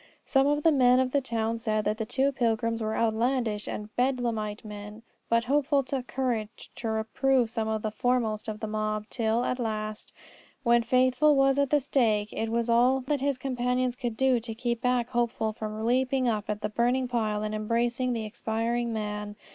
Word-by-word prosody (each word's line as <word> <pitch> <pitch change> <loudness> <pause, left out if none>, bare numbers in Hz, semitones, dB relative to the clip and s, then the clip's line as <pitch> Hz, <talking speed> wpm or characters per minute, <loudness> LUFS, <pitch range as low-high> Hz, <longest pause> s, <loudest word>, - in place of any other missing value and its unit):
Some 270 0 +3
of 295 +1 +1
the 325 - +6
men 255 -3 +5
of 260 -1 +1
the 280 - +2
town 230 -2 -2
said 215 -2 -1
that 215 +2 -1
the 220 - -2
two 270 +4 +1
pilgrims 230 -3 0
were 220 0 -2
outlandish 230 -1 0
and 210 +1 -6
bedlamite 235 -5 -1
men, 210 +1 -9 0.3
but 230 0 +3
Hopeful 280 +2 +2
took 260 -1 -4
courage 235 -5 -3
to 230 - -3
reprove 225 +2 +1
some 220 -1 -2
of 220 -1 -2
the 215 - -1
foremost 225 -1 0
of 215 -1 -5
the 220 - -2
mob. 215 0 -2
Till, 230 0 0
at 250 - -1
last, 215 -2 -4 0.5
when 235 -1 +4
Faithful 255 +5 +3
was 270 0 +3
at 280 -1 +2
the 295 - +4
stake, 220 -6 +1
it 225 - -2
was 235 +1 0
all 245 +3 +4
that 275 +2 -1
his 280 -1 0
companions 250 -1 -1
could 240 -3 -4
do 265 -2 +3
to 225 -1 -6
keep 235 0 -2
back 250 -2 +1
Hopeful 235 -3 -1
from 215 0 -5
leaping 255 +1 +2
up 215 -3 -1
on 210 - -1
the 210 - 0
burning 245 +4 +1
pile 215 -3 -1
and 215 0 -3
embracing 235 +4 0
the 225 -2 -3
expiring 230 +2 -2
man. 210 -1 -4
235 Hz, 195 wpm, -28 LUFS, 220-255 Hz, 0.5 s, the